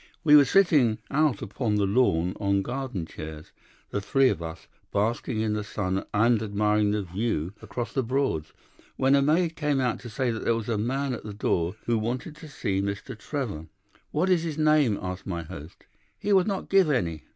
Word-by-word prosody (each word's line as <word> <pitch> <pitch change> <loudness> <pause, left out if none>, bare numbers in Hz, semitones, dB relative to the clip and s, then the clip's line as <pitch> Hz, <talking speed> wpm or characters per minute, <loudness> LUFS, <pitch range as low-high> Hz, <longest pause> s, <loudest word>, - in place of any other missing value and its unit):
"We 150 -3 +7
were 145 -1 +8
sitting 145 - +4
out 150 -1 +2
upon 110 -5 -1
the 105 -1 +2
lawn 95 -5 +2
on 100 -1 +1
garden 125 -7 -4
chairs, 80 -1 -9 0.4
the 100 - -1
three 135 +5 +3
of 85 - -2
us, 80 -1 -7 0.3
basking 110 +2 0
in 110 -1 0
the 105 0 -2
sun 95 -2 -2
and 115 +1 +3
admiring 105 0 +1
the 105 0 0
view 95 -2 -2
across 115 +3 -5
the 135 - +1
Broads, 125 - -1 0.4
when 135 +1 +3
a 140 - +5
maid 160 +3 +2
came 150 -3 0
out 125 -3 0
to 120 - -9
say 125 +2 -1
that 115 - -4
there 115 - +2
was 115 0 -4
a 115 - +1
man 135 +4 -1
at 120 - -6
the 105 -1 -7
door 90 -3 0
who 115 -1 +1
wanted 125 +8 -3
to 155 - -10
see 100 -9 -2
Mr. 100 +3 -4
Trevor. 110 - -4 0.4
"'What 180 +5 +1
is 175 -3 +4
his 160 -3 -4
name?' 150 -8 +3
asked 90 0 -6
my 85 -3 -3
host. 80 0 -11 0.3
"'He 205 - 0
would 190 -1 +4
not 195 -2 -2
give 195 -4 +5
any. 85 - -1
115 Hz, 200 wpm, -26 LUFS, 100-140 Hz, 0.4 s, were